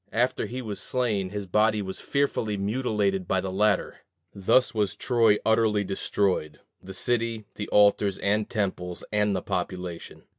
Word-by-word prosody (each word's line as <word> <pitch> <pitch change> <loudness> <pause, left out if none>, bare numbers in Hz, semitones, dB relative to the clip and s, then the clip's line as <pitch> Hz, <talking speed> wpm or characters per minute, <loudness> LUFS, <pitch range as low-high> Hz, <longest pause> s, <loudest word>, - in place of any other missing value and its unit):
After 125 +2 0
he 130 +1 -5
was 105 -3 -5
slain, 110 -7 0
his 100 0 -5
body 105 +3 +2
was 95 -2 -5
fearfully 115 -7 -1
mutilated 100 -3 0
by 95 - +1
the 95 0 -3
latter. 100 +1 +1 0.4
Thus 100 +6 +3
was 105 -2 0
Troy 115 -2 +3
utterly 110 -2 +3
destroyed 95 -5 -1 0.2
the 95 0 -9
city, 115 -1 -1
the 105 - -5
altars 100 -1 +4
and 105 +1 0
temples, 90 -4 -3
and 105 -1 +2
the - - -3
population. 90 -2 -5
105 Hz, 150 wpm, -26 LUFS, 95-110 Hz, 0.4 s, altars